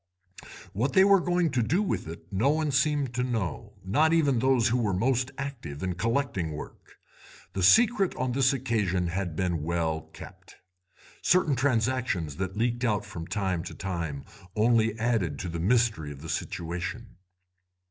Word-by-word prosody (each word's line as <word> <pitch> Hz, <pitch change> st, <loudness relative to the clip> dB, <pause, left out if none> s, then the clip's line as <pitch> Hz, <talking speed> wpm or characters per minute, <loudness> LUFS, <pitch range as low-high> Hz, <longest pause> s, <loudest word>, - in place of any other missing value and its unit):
What 125 Hz, +7 st, -1 dB
they 190 Hz, -, +7 dB
were 200 Hz, 0 st, +6 dB
going 175 Hz, -2 st, +1 dB
to 130 Hz, -, +1 dB
do 175 Hz, -, +1 dB
with 195 Hz, -, -2 dB
it 85 Hz, +4 st, -10 dB
no 110 Hz, +9 st, +2 dB
one 155 Hz, 0 st, +1 dB
seemed 140 Hz, -1 st, +1 dB
to 125 Hz, -, -1 dB
know, 110 Hz, -, -3 dB
not 150 Hz, +12 st, +3 dB
even 145 Hz, -7 st, +3 dB
those 130 Hz, -2 st, +3 dB
who 125 Hz, +2 st, +1 dB
were 105 Hz, -5 st, 0 dB
most 125 Hz, +5 st, +1 dB
active 120 Hz, -, -6 dB
in 90 Hz, -1 st, -1 dB
collecting 105 Hz, -, -1 dB
work. 75 Hz, -, -10 dB, 0.6 s
The 95 Hz, -, -2 dB
secret 210 Hz, -, +4 dB
on 130 Hz, 0 st, -1 dB
this 130 Hz, +1 st, +3 dB
occasion 105 Hz, -9 st, 0 dB
had 90 Hz, -2 st, -3 dB
been 85 Hz, -2 st, -1 dB
well 80 Hz, 0 st, -1 dB
kept. -, -, -13 dB, 0.7 s
Certain 170 Hz, -6 st, +3 dB
transactions 120 Hz, -, 0 dB
that 95 Hz, +1 st, -4 dB
leaked 120 Hz, +2 st, 0 dB
out 105 Hz, -4 st, +1 dB
from 90 Hz, -6 st, -7 dB
time 95 Hz, -4 st, -1 dB
to -, -, -8 dB
time 85 Hz, -7 st, -4 dB, 0.3 s
only 110 Hz, 0 st, +2 dB
added 110 Hz, -10 st, 0 dB
to 90 Hz, -, -5 dB
the 85 Hz, 0 st, -4 dB
mystery 105 Hz, -6 st, +1 dB
of 70 Hz, +1 st, -10 dB
the 80 Hz, -, -7 dB
situation. 90 Hz, +5 st, -4 dB
115 Hz, 165 wpm, -27 LUFS, 90-130 Hz, 0.7 s, they